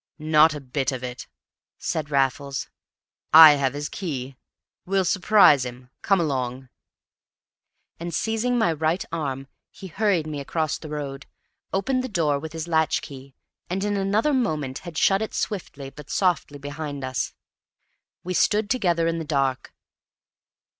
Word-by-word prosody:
"Not 155 Hz, 0 st, +4 dB
a -, -, -5 dB
bit 135 Hz, 0 st, -2 dB
of 130 Hz, -1 st, -5 dB
it," 125 Hz, 0 st, -6 dB, 0.5 s
said 155 Hz, -3 st, -3 dB
Raffles. 140 Hz, 0 st, 0 dB, 0.7 s
"I 160 Hz, -1 st, +11 dB
have 140 Hz, -2 st, 0 dB
his 145 Hz, +1 st, -3 dB
key. 135 Hz, -8 st, -5 dB, 0.5 s
We'll 190 Hz, 0 st, 0 dB
surprise 185 Hz, -7 st, +5 dB
him. 125 Hz, 0 st, -9 dB
Come 195 Hz, -2 st, +2 dB
along." 130 Hz, -4 st, -2 dB, 1.3 s
And 170 Hz, +1 st, -5 dB
seizing 225 Hz, +7 st, 0 dB
my 220 Hz, -8 st, +2 dB
right 160 Hz, +4 st, -1 dB
arm, 135 Hz, -5 st, -3 dB, 0.2 s
he -, -, -12 dB
hurried 190 Hz, -2 st, 0 dB
me 150 Hz, -2 st, -5 dB
across 155 Hz, +2 st, -2 dB
the 155 Hz, -, -9 dB
road, 140 Hz, -2 st, -6 dB, 0.4 s
opened 255 Hz, +6 st, 0 dB
the 260 Hz, -, -4 dB
door 155 Hz, -8 st, +1 dB
with 160 Hz, +2 st, -8 dB
his 165 Hz, 0 st, -5 dB
latch 160 Hz, -2 st, +1 dB
key, 135 Hz, -2 st, -11 dB, 0.3 s
and 190 Hz, +2 st, -2 dB
in 205 Hz, 0 st, 0 dB
another 205 Hz, +8 st, +1 dB
moment 155 Hz, -, -1 dB
had 170 Hz, -3 st, -9 dB
shut 195 Hz, +4 st, +3 dB
it 220 Hz, -, -4 dB
swiftly 145 Hz, -9 st, -4 dB
but 150 Hz, -1 st, -13 dB
softly 175 Hz, -6 st, 0 dB
behind 145 Hz, 0 st, -6 dB
us. 130 Hz, -1 st, -3 dB, 0.9 s
We 185 Hz, -, -3 dB
stood 210 Hz, +3 st, +2 dB
together 175 Hz, -9 st, +1 dB
in 165 Hz, 0 st, 0 dB
the -, -, -3 dB
dark. 135 Hz, -5 st, -1 dB
155 Hz, 150 wpm, -24 LUFS, 140-185 Hz, 1.3 s, I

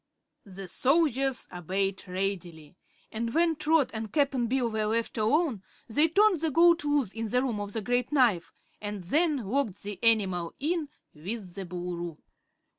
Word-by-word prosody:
The 195 Hz, 0 st, -8 dB
soldiers 270 Hz, -, +1 dB
obeyed 190 Hz, +3 st, -2 dB
readily, 180 Hz, -4 st, -4 dB, 0.4 s
and 230 Hz, +1 st, -3 dB
when 330 Hz, 0 st, +3 dB
Trot 305 Hz, -1 st, +2 dB
and 220 Hz, -1 st, -5 dB
Cap'n 275 Hz, -5 st, +1 dB
Bill 250 Hz, 0 st, +1 dB
were 220 Hz, -1 st, -1 dB
left 230 Hz, +1 st, -1 dB
alone 255 Hz, -, +1 dB, 0.3 s
they 295 Hz, +7 st, +3 dB
turned 390 Hz, 0 st, +3 dB
the 325 Hz, -, +1 dB
goat 340 Hz, +2 st, +5 dB
loose 290 Hz, -8 st, 0 dB
in 225 Hz, -1 st, -4 dB
the 250 Hz, +3 st, +2 dB
Room 235 Hz, -6 st, -2 dB
of 205 Hz, 0 st, -5 dB
the 225 Hz, -, -2 dB
Great 245 Hz, +4 st, 0 dB
Knife 240 Hz, -, +2 dB, 0.3 s
and 205 Hz, -2 st, -5 dB
then 295 Hz, -, +1 dB
locked 225 Hz, -4 st, -1 dB
the 205 Hz, +1 st, -7 dB
animal 190 Hz, -7 st, +2 dB
in 315 Hz, 0 st, -1 dB, 0.2 s
with 185 Hz, +4 st, -6 dB
the 195 Hz, -1 st, -6 dB
Boolooroo. 175 Hz, -2 st, -5 dB
225 Hz, 160 wpm, -28 LUFS, 195-285 Hz, 0.4 s, goat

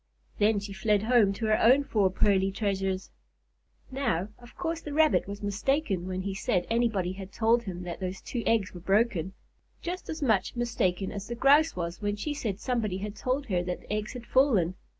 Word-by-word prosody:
Then 210 Hz, +1 st, +4 dB
she 200 Hz, 0 st, -7 dB
fled 205 Hz, +1 st, +1 dB
home 225 Hz, -3 st, +4 dB
to 220 Hz, +3 st, -4 dB
her 215 Hz, 0 st, +2 dB
own 260 Hz, +5 st, +6 dB
four 210 Hz, -8 st, +2 dB
pearly 195 Hz, 0 st, +2 dB
treasures. 195 Hz, -2 st, -2 dB, 0.8 s
Now, 230 Hz, -9 st, -1 dB
of 240 Hz, 0 st, -15 dB
course 330 Hz, -1 st, -2 dB
the 295 Hz, -, -6 dB
Rabbit 310 Hz, -8 st, +3 dB
was 200 Hz, +1 st, -7 dB
mistaken 205 Hz, -, 0 dB
when 185 Hz, 0 st, -3 dB
he 200 Hz, 0 st, -3 dB
said 185 Hz, -2 st, 0 dB
anybody 225 Hz, -6 st, +1 dB
had 190 Hz, 0 st, -9 dB
told 230 Hz, +2 st, +2 dB
him 180 Hz, -2 st, -5 dB
that 175 Hz, -1 st, -6 dB
those 185 Hz, 0 st, -4 dB
two 240 Hz, -, -4 dB
eggs 220 Hz, -4 st, +1 dB
were 180 Hz, -, -8 dB
broken; 195 Hz, -2 st, +1 dB, 0.5 s
just 360 Hz, +2 st, -5 dB
as 315 Hz, -1 st, -4 dB
much 220 Hz, -6 st, +1 dB
mistaken 200 Hz, -6 st, -1 dB
as 200 Hz, -1 st, -6 dB
the 235 Hz, -, -4 dB
Grouse 285 Hz, +6 st, +4 dB
was 170 Hz, +2 st, -4 dB
when 205 Hz, 0 st, -1 dB
she 290 Hz, +8 st, -3 dB
said 220 Hz, -9 st, -3 dB
somebody 220 Hz, -7 st, -1 dB
had 205 Hz, +2 st, -5 dB
told 255 Hz, +6 st, -1 dB
her 185 Hz, -7 st, 0 dB
that 180 Hz, 0 st, -4 dB
the -, -, -6 dB
eggs 215 Hz, 0 st, -3 dB
had 245 Hz, -2 st, -8 dB
fallen. 225 Hz, -, +3 dB
210 Hz, 200 wpm, -28 LUFS, 190-240 Hz, 0.8 s, own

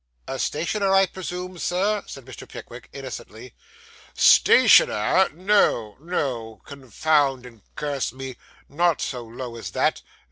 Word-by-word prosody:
'A 135 Hz, -, -5 dB
stationer, 195 Hz, +6 st, -1 dB
I 195 Hz, 0 st, +5 dB
presume, 180 Hz, 0 st, -7 dB
Sir?' 200 Hz, +5 st, 0 dB
said 135 Hz, -3 st, -10 dB
Mr. 130 Hz, -4 st, -11 dB
Pickwick -, -, -11 dB
innocently. 125 Hz, -3 st, -9 dB, 0.6 s
'Stationer! 105 Hz, -, +5 dB
No, 175 Hz, -, +1 dB
no; 125 Hz, -, -4 dB
confound 140 Hz, 0 st, 0 dB
and 115 Hz, -3 st, -14 dB
curse 140 Hz, -5 st, -2 dB
me! 130 Hz, 0 st, -8 dB, 0.3 s
Not 170 Hz, +2 st, +1 dB
so 125 Hz, -3 st, -4 dB
low 120 Hz, +1 st, -8 dB
as 115 Hz, -, -6 dB
that. -, -, 0 dB
140 Hz, 120 wpm, -23 LUFS, 120-180 Hz, 0.6 s, I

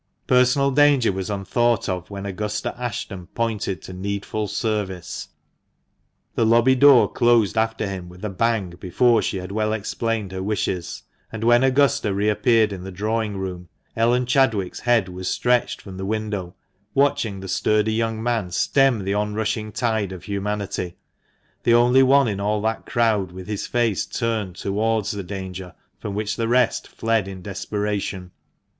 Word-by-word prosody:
Personal 125 Hz, +2 st, +3 dB
danger 145 Hz, -4 st, +4 dB
was 95 Hz, +1 st, -4 dB
unthought 110 Hz, +3 st, 0 dB
of 90 Hz, -1 st, -3 dB
when 100 Hz, -1 st, -6 dB
Augusta 105 Hz, +2 st, -3 dB
Ashton 105 Hz, -6 st, -5 dB
pointed 105 Hz, -5 st, -2 dB
to 95 Hz, -, -8 dB
needful 100 Hz, +3 st, -3 dB
service. 100 Hz, -4 st, -3 dB, 1.1 s
The -, -, +1 dB
lobby 115 Hz, +3 st, +5 dB
door 135 Hz, -2 st, +7 dB
closed 120 Hz, -5 st, +3 dB
after 110 Hz, 0 st, 0 dB
him 95 Hz, -3 st, -5 dB
with 90 Hz, +3 st, -9 dB
a -, -, -1 dB
bang 110 Hz, -2 st, 0 dB
before 115 Hz, +5 st, +3 dB
she 100 Hz, -, -2 dB
had 95 Hz, +1 st, -6 dB
well 110 Hz, +1 st, 0 dB
explained 110 Hz, -1 st, -2 dB
her 95 Hz, 0 st, -4 dB
wishes; 95 Hz, -3 st, -2 dB, 0.3 s
and 110 Hz, -1 st, -5 dB
when 120 Hz, +2 st, +5 dB
Augusta 135 Hz, -5 st, +2 dB
re 105 Hz, +2 st, +1 dB
appeared 110 Hz, -1 st, +3 dB
in 90 Hz, -2 st, -7 dB
the 95 Hz, -, -7 dB
drawing 105 Hz, +2 st, -2 dB
room, 90 Hz, -2 st, -5 dB, 0.3 s
Ellen 120 Hz, +2 st, +2 dB
Chadwick's 115 Hz, -7 st, +1 dB
head 120 Hz, -5 st, +2 dB
was 90 Hz, 0 st, -6 dB
stretched 125 Hz, -1 st, +1 dB
from 95 Hz, -2 st, -9 dB
the 95 Hz, -, -5 dB
window, 105 Hz, -4 st, -3 dB, 0.4 s
watching 125 Hz, -8 st, +1 dB
the 95 Hz, -, -7 dB
sturdy 110 Hz, +3 st, +1 dB
young 115 Hz, 0 st, -1 dB
man 115 Hz, -6 st, 0 dB
stem 130 Hz, +4 st, +2 dB
the 100 Hz, +1 st, -1 dB
on 105 Hz, 0 st, -1 dB
rushing 110 Hz, 0 st, -2 dB
tide 110 Hz, -3 st, -1 dB
of 90 Hz, -2 st, -8 dB
humanity 100 Hz, -2 st, -3 dB, 0.3 s
— -, -, -41 dB
the 120 Hz, -, +4 dB
only 125 Hz, +2 st, +5 dB
one 135 Hz, 0 st, +5 dB
in 100 Hz, -3 st, -2 dB
all 105 Hz, +1 st, 0 dB
that 110 Hz, 0 st, -2 dB
crowd 110 Hz, -6 st, +1 dB
with 95 Hz, 0 st, -9 dB
his 105 Hz, +1 st, -4 dB
face 120 Hz, -5 st, 0 dB
turned 110 Hz, -6 st, -2 dB
towards 110 Hz, +3 st, 0 dB
the 100 Hz, -2 st, -4 dB
danger 95 Hz, -1 st, -7 dB, 0.2 s
from 100 Hz, -2 st, -5 dB
which 105 Hz, 0 st, -2 dB
the 115 Hz, -1 st, -1 dB
rest 125 Hz, 0 st, +2 dB
fled 115 Hz, -3 st, 0 dB
in 95 Hz, -2 st, -8 dB
desperation. 100 Hz, -2 st, -3 dB
105 Hz, 165 wpm, -22 LUFS, 95-115 Hz, 1.1 s, door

